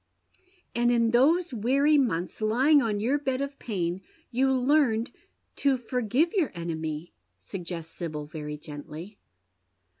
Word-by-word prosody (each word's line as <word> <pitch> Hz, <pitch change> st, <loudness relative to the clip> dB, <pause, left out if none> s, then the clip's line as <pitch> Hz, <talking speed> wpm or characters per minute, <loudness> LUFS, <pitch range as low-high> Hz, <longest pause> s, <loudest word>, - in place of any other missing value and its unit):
" 370 Hz, -1 st, -36 dB
And 240 Hz, 0 st, +3 dB
in 235 Hz, -1 st, +3 dB
those 305 Hz, +7 st, +3 dB
weary 270 Hz, +7 st, +3 dB
months, 220 Hz, -, 0 dB
lying 260 Hz, +8 st, +4 dB
on 215 Hz, -4 st, 0 dB
your 255 Hz, +7 st, +1 dB
bed 265 Hz, -2 st, -1 dB
of 280 Hz, 0 st, -4 dB
pain, 180 Hz, -4 st, -2 dB, 0.3 s
you 265 Hz, +2 st, +2 dB
learned 255 Hz, -3 st, +2 dB, 0.5 s
to 275 Hz, -2 st, +2 dB
forgive 250 Hz, +6 st, 0 dB
your 365 Hz, -8 st, +1 dB
enemy," 160 Hz, -1 st, -4 dB, 0.3 s
suggests 170 Hz, -, -6 dB
Sibyl, 155 Hz, -4 st, -5 dB
very 150 Hz, -1 st, -6 dB
gently. 155 Hz, +6 st, -9 dB
235 Hz, 130 wpm, -27 LUFS, 170-275 Hz, 0.5 s, lying